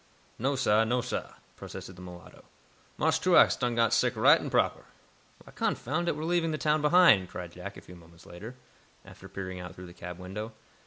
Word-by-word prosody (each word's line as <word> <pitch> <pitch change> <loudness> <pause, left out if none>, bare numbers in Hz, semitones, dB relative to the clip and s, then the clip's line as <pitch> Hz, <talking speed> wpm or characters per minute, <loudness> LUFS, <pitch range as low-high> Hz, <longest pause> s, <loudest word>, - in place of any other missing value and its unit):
"No, 135 +4 0
sah; 110 -4 +3
no, 120 +2 0
sah," 125 - -5 0.2
protested 95 - -9
the 90 - -12
mulatto. 90 -2 -12 0.5
"Marse - - +2
Truax - - +5
done 120 -1 -1
got 115 -1 +2
sick 125 +1 +2
right 140 +9 +5
and - - -5
proper." - - +1 0.6
"Why, - - -15
confound 155 +7 -2
it, - - +1
we're 155 - -5
leaving 170 0 +1
the 155 - -2
town 150 0 +1
behind," 150 - +5
cried 90 -2 -7
Jack, 90 +3 -9
a - - -10
few 90 - -14
moments 85 0 -17
later, 110 +8 -10 0.5
after - - -13
peering 95 -1 -6
out 90 0 -8
through 90 - -10
the 85 - -12
cab 90 0 -8
window. 100 +5 -7
110 Hz, 200 wpm, -29 LUFS, 90-135 Hz, 0.6 s, Truax